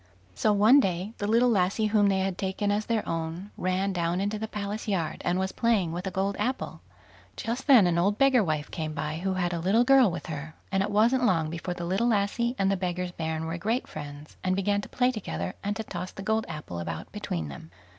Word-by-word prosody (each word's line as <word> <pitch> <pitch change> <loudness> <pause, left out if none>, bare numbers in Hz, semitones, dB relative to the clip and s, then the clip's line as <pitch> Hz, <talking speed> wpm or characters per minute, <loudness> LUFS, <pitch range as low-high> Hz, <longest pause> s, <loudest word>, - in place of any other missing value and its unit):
So 160 - +2
one 215 +7 +6
day 190 -1 -1
the 205 - -1
little 230 +3 +4
lassie 195 +1 +2
whom 205 -2 +5
they 190 -1 +2
had 190 -1 -1
taken 195 +2 -1
as 210 +1 -1
their 225 -2 0
own, 165 +4 -4
ran 185 +2 0
down 170 0 0
into 205 +2 -1
the 220 - -3
palace 210 +1 -4
yard, 180 -6 -1
and 175 +1 +1
was 190 0 -1
playing 220 -8 +1
with 180 +3 -4
a - - 0
gold 195 +1 -1
apple. 260 +1 -2 0.6
Just 240 +5 -3
then 250 -9 +8
an 170 -1 +2
old 200 +4 +2
beggar 270 -4 +5
wife 155 -4 -2
came 155 -2 -4
by, 150 +1 -3
who 190 +1 -1
had 175 -1 0
a 170 - -2
little 195 +8 +3
girl 265 -3 +6
with 175 - -5
her, 155 -1 -6 0.2
and 195 0 +2
it 195 - 0
wasn't 230 +5 +3
long 165 -7 +2
before 170 +1 -4
the 175 - -5
little 195 +7 +1
lassie 235 +3 +1
and 195 0 +2
the 195 - +1
beggar's 180 -1 -2
bairn 160 -1 -3
were 165 +2 -4
great 225 +8 -1
friends, 145 0 -9
and 185 0 +1
began 200 +1 +1
to - - -10
play 250 0 +2
together, 90 - -4
and 205 +1 -1
to 220 - -3
toss 185 -3 -5
the 195 - -8
gold 220 +1 0
apple 150 - -6
about 85 - -5
between 80 -3 -4
them. 70 +3 -10
190 Hz, 235 wpm, -27 LUFS, 170-215 Hz, 0.6 s, then